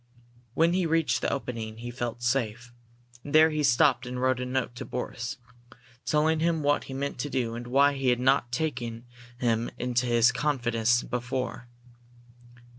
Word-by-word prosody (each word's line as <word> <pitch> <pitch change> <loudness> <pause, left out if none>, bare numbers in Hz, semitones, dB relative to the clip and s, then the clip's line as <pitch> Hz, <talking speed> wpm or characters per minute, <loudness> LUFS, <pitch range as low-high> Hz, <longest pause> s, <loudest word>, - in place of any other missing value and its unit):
When 165 +2 +3
he 180 -2 +1
reached 165 -1 +1
the - - 0
opening 115 -4 -4
he 120 +1 -6
felt 120 -1 -5
safe, 120 -1 -1 0.5
and 145 +1 -4
there 160 +1 +7
he 155 0 -1
stopped 130 -2 +3
and 125 0 -4
wrote 130 0 +1
a 125 - -3
note 130 -2 -2
to - - -5
Boris, 125 -1 -5 0.7
telling 155 +1 +2
him 165 -1 +1
what 145 0 +1
he 135 - -8
meant 140 -1 -3
to 145 - -2
do 125 -4 -1
and 120 +1 -6
why 140 +3 +4
he 135 -1 -2
had 125 -1 +2
not 130 -1 +2
taken 120 -4 -3 0.3
him 115 -2 0
into 125 0 0
his 120 0 +4
confidence 120 -4 +1
before. 125 0 -4
125 Hz, 170 wpm, -27 LUFS, 120-145 Hz, 0.7 s, there